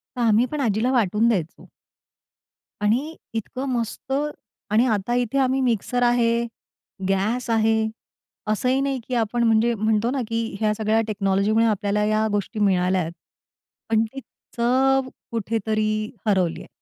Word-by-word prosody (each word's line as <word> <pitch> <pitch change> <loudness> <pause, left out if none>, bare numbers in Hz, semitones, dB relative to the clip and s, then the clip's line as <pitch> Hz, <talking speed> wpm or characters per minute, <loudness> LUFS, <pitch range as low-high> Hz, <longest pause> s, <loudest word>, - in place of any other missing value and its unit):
तर 250 - -3
आम्ही 230 +1 +4
पण 300 - -3
आजीला 225 +1 +1
वाटून 225 -2 +2
द्यायचो. 180 -9 -2 1.1
आणि 255 +10 +1 0.2
इतकं 240 +4 -4
मस्त 240 +1 -3 0.6
आणि 225 +4 +4
आता 220 -1 0
इथे 245 +2 0
आम्ही 265 0 +2
मिक्सर 245 0 0
आहे, 235 -1 +2 0.6
गॅस 215 +6 0
आहे, 220 0 +2 0.6
असंही 250 +5 +1
नाही 275 -2 -1
की 255 - -2
आपण 235 +1 0
म्हणजे, 225 +1 +3
म्हणतो 220 +2 +1
ना, 270 - -1
की 230 -2 -2
ह्या 215 -1 +2
सगळ्या 220 +1 +1
टेक्नॉलॉजीमुळे 205 +2 +2
आपल्याला 210 -1 +1
या 215 +1 +2
गोष्टी 205 +2 -2
मिळाल्या 185 -2 +2
आहेत. 165 0 -4 0.8
पण 220 0 +3
ती 270 +5 -8 0.4
चव 260 +2 +2 0.2
कुठेतरी 215 -1 -1 0.3
हरवली 185 -5 +1
आहे. - - -12
225 Hz, 140 wpm, -23 LUFS, 210-245 Hz, 1.1 s, आम्ही